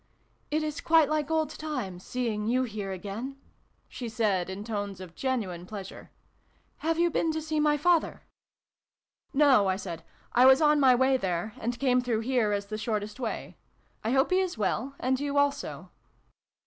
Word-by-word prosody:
" - - -41
It 310 +1 0
is 305 0 -3
quite 320 -2 +4
like 305 -1 0
old 315 -2 +1
times, 255 - -5
seeing 225 -4 -2
you 255 +3 +2
here 210 -5 -4
again! 210 +8 -6 0.2
" - - -41
she 240 -2 -6
said, 210 -6 0
in 190 +2 -5
tones 205 -3 -4
of 185 -2 -9
genuine 195 -10 -3
pleasure. 195 -2 -8 0.3
" - - -39
Have 325 +1 -1
you 345 0 +3
been 325 0 +1
to 315 - -1
see 310 0 -2
my 300 0 +3
father? 335 +2 +1 0.3
" - - -66
" - - -66 0.3
No," 270 -8 +5
I 190 - +2
said: 170 -4 -6 0.2
" - - -31
I 250 +2 +6
was 265 +1 +7
on 300 -1 +4
my 260 -3 +6
way 260 +1 +3
there, 190 -1 -2
and 240 +1 -3
came 250 -2 +3
through 235 -3 -1
here 240 -3 +1
as 200 0 -1
the 215 +1 -5
shortest 215 0 -3
way. 235 -4 -4 0.5
I 220 - -1
hope 265 +7 +2
he 370 - +4
is 370 -8 -1
well, 225 +6 -1
and 260 +1 0
you 285 0 -2
also 285 0 -1
250 Hz, 200 wpm, -28 LUFS, 205-290 Hz, 0.5 s, was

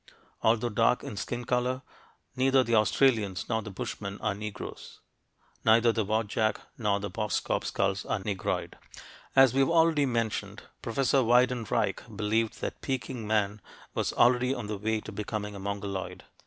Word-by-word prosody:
Although 115 +1 +2
dark 115 +3 +2
in 140 -6 -6
skin 120 +4 -4
color, 125 +1 0 0.5
neither 130 0 +4
the 115 - -2
Australians 110 -4 +2
nor 110 -1 0
the 105 - -8
Bushmen 100 0 -5
are 105 - 0
Negroes; 105 +1 -8 0.6
neither 115 +1 +5
the 110 -1 0
Wadjak 110 +1 0 0.2
nor 105 -4 0
the 100 -1 -5
Boskop 105 +1 -1
skulls 95 0 0
are - - 0
"Negroid." 100 -1 -3 0.6
As 135 -2 +7
we've 135 +2 +3
already 165 -3 +4
mentioned, 115 -3 -2 0.2
Professor 135 +3 +2
Weidenreich 120 -3 +2 0.2
believed 110 +1 0
that - - -4
Peking 130 -4 -3
man 105 -1 0 0.3
was - - 0
already 125 +2 +4
on 120 - -5
the 105 -1 -4
way 110 +1 0
to 110 - -8
becoming 105 0 -4
a 100 - -8
Mongoloid. 100 -1 -4
110 Hz, 150 wpm, -29 LUFS, 105-125 Hz, 0.6 s, As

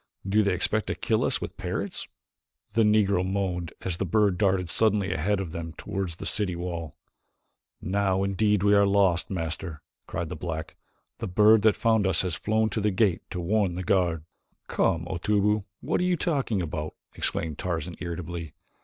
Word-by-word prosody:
"Do 105 +3 +3
they 100 -3 +1
expect 105 +4 +1
to - - -1
kill - - 0
us - - +1
with - - -7
parrots?" - - -4 0.7
The 115 - +3
Negro 105 -4 +3
moaned 95 -3 -2
as 90 -3 -1
the - - -1
bird 100 0 +2
darted 95 -3 +2
suddenly 100 0 +2
ahead 95 +4 0
of 95 -5 -4
them 85 -1 -5
toward 95 +2 -4
the 80 - -8
city 100 -4 +1
wall. 85 -3 -5 0.9
"Now 95 0 +1
indeed 105 +1 +1
are - - +1
we 100 - +5
lost, 100 -4 +3
Master," 80 -2 -4 0.2
cried 85 -2 -3
the - - -5
black. 80 -2 -5 0.4
"The - - -3
bird 105 +4 +5
that 110 -1 +4
found 110 -3 +2
us 95 -2 +2
has 90 -3 -2
flown 110 +4 0
to 110 - -1
the 105 - +2
gate 95 -3 +2
to 90 - -4
warn 95 0 +1
the 90 - -3
guard." 85 -3 +1 0.4
"Come, 85 0 +1
Otobu, 105 +3 +1 0.2
what - - 0
are - - +1
you 180 -1 +2
talking 135 - 0
about?" 75 -1 -4 0.2
exclaimed 80 -3 0
Tarzan 85 -1 -3
irritably. 85 -2 -5
95 Hz, 180 wpm, -27 LUFS, 85-105 Hz, 0.9 s, we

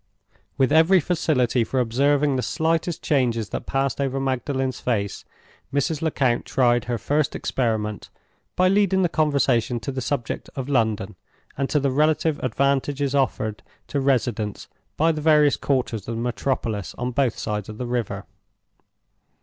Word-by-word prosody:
With 135 0 +2
every 165 +5 +6
facility 145 -8 +1
for 130 +3 -1
observing 140 +4 +2
the 130 - 0
slightest 165 +3 -1
changes 120 -8 +1
that - - -5
passed 135 +1 0
over 135 0 -1
Magdalen's 130 0 -1
face, 100 -5 -2 0.5
Mrs. 145 +2 0
Lecount 135 -7 +1
tried 120 -2 +2
her 120 -1 -1
first 145 +6 0
experiment 110 -4 -2 0.5
by 185 +1 +4
leading 195 -1 +3
the 175 - +2
conversation 135 -7 +1
to 140 - -4
the 130 0 -4
subject 120 -1 -3
of 135 -1 -4
London, 115 -6 0 0.4
and 135 0 -2
to 150 - +2
the 140 -1 0
relative 155 +2 +2
advantages 140 +2 0
offered 110 -6 0 0.3
to 140 - -1
residents 120 -6 0 0.3
by 165 +2 +4
the 155 -1 -4
various 150 -2 +5
quarters 120 -7 -1
of 115 - -3
the 115 - -3
metropolis 120 -4 -2
on 125 +1 -3
both 125 -2 0
sides 105 -2 -3
of 105 - -8
the 125 - -4
river. 120 -3 -3
135 Hz, 150 wpm, -23 LUFS, 120-145 Hz, 0.5 s, every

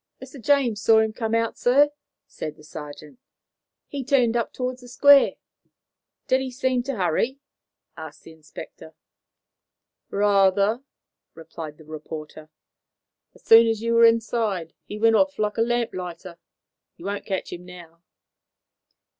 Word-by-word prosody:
"Mr. 265 0 -11
James 245 -5 +1
saw 225 +1 +5
him 220 0 +2
come 225 -1 -2
out, 230 0 -1
sir," 285 +4 +4 0.3
said 150 - -7
the 150 - -18
sergeant. 150 - -10 0.7
"He 280 -2 -5
turned 250 -3 +2
up 235 -2 -1
towards 255 0 -4
the 245 - -13
Square." 280 +3 +5 0.9
"Did 260 0 +2
he 265 - -4
seem 255 0 -1
to 275 -1 -3
hurry?" 195 - 0 0.6
asked 160 -1 -10
the - - -13
inspector. 160 0 -12 1.1
"Rather," 200 +2 +2 0.5
replied 160 -2 -9
the 155 - -16
reporter. 155 0 -9 0.9
"As - - -21
soon 230 0 +7
as 225 -1 -1
you 230 0 0
were 230 0 +6
inside, 225 -7 0
he 210 - -7
went 225 +1 +3
off 285 -1 +1
like 210 -1 -2
a - - +1
lamplighter. 185 -8 -3 0.6
You 170 - -12
won't 200 0 -4
catch 190 -3 -4
him 175 0 -9
now." 175 -2 -14
220 Hz, 140 wpm, -23 LUFS, 170-245 Hz, 1.1 s, soon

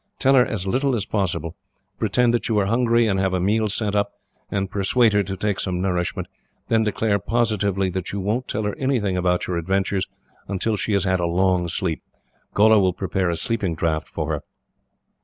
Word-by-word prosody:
Tell 135 0 +3
her 130 -2 +6
as 105 -6 -3
little 130 +6 +1
as 105 -4 -1
possible. 90 -5 -2 0.4
Pretend 115 +2 +2
that 120 - 0
you 110 - +1
are 100 - +3
hungry, 115 +2 +3
and 95 -3 +1
have 95 -1 +1
a - - 0
meal 105 +4 +1
sent 105 0 -1
up, 100 0 0 0.4
and 95 -1 -1
persuade 105 +4 +2
her 105 - +4
to 95 0 -4
take 100 0 -1
some 90 -3 -1
nourishment; 90 -2 -1 0.4
then 110 -1 +3
declare, 105 -1 0
positively, 100 -3 0
that 90 0 -4
you 100 - -3
won't 110 +7 -1
tell 110 - -2
her 105 -1 -2
anything 120 -8 0
about 90 0 +1
your 90 - -2
adventures, 95 +2 0 0.4
until 105 +3 -1
she 105 +1 -2
has 100 -2 +2
had 95 -1 +1
a 85 - 0
long 90 0 +1
sleep. 85 -1 -2 0.5
Gholla 110 +1 +6
will 95 -2 +2
prepare 95 0 -1
a 85 - 0
sleeping 100 -3 -1
draught 80 -1 -1
for - - -4
her. - - -2
100 Hz, 200 wpm, -22 LUFS, 95-110 Hz, 0.5 s, her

